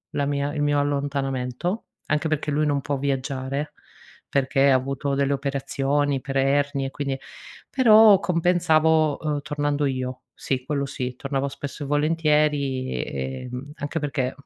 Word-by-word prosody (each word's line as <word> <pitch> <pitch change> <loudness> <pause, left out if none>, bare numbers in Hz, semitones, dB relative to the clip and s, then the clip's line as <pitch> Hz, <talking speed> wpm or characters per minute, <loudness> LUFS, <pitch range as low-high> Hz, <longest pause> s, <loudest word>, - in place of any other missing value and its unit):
la 145 - +1
mia 145 0 -1
il 150 - -2
mio 145 0 +2
allontanamento, 140 - -2 0.2
anche 155 +1 +1
perché 155 -1 -1
lui 150 +1 +1
non 145 -1 +1
può 140 +1 -2
viaggiare, 135 +1 -2 0.6
perché 135 0 +2
ha - - +6
avuto 135 +2 -1
delle 140 0 +1
operazioni 140 0 -1
per 135 0 -3
ernie 140 0 +1
e - - -8
quindi 135 -1 -3 0.5
però 220 -5 +7
compensavo 160 -4 +3
uhm, 150 -2 -1
tornando 145 0 -1
io. 130 -1 -2 0.2
Sì 130 -2 -2
quello 140 0 -1
sì. 125 -1 -4
Tornavo 135 +1 -2
spesso 140 +2 -6
e 140 - -5
volentieri, 145 - 0
uhm, 130 +4 -7
anche 145 +3 -3
perché, 140 -3 -2
140 Hz, 145 wpm, -24 LUFS, 135-150 Hz, 0.6 s, però